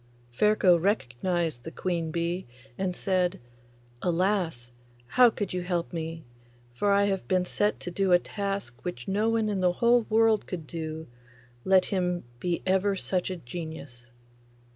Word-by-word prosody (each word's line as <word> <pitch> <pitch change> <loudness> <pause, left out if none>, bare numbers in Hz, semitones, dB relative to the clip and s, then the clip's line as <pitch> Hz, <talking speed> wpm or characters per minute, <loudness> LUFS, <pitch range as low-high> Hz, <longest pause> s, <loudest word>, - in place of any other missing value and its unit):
Ferko 190 - +4
recognised 165 - -1
the - - -6
queen 170 -1 -2
bee, 170 +2 -2 0.3
and 185 +2 -2
said, 185 0 0 0.6
'Alas! 175 - 0 0.4
how 250 - +6
could 205 -4 -4
you 180 - -1
help 175 -1 -2
me? 165 -1 -4 0.5
for 200 +12 +1
I 200 0 +4
have 195 -2 -1
been 185 -1 +2
set 205 +3 0
to 175 - -5
do 190 +1 +1
a 175 - +8
task 195 - -4
which 150 -9 -5
no 210 +3 +1
one 225 -1 +1
in 205 -2 -1
the 180 -1 +3
whole 235 +3 +3
world 225 -1 +3
could 170 -4 -5
do, 160 -1 -5 0.6
let 190 -1 +4
him 180 -2 -1 0.2
be 175 +2 -2
ever 190 +1 +2
such 185 -1 -1
a 185 - -3
genius! 145 -5 -8
180 Hz, 155 wpm, -28 LUFS, 165-200 Hz, 0.6 s, a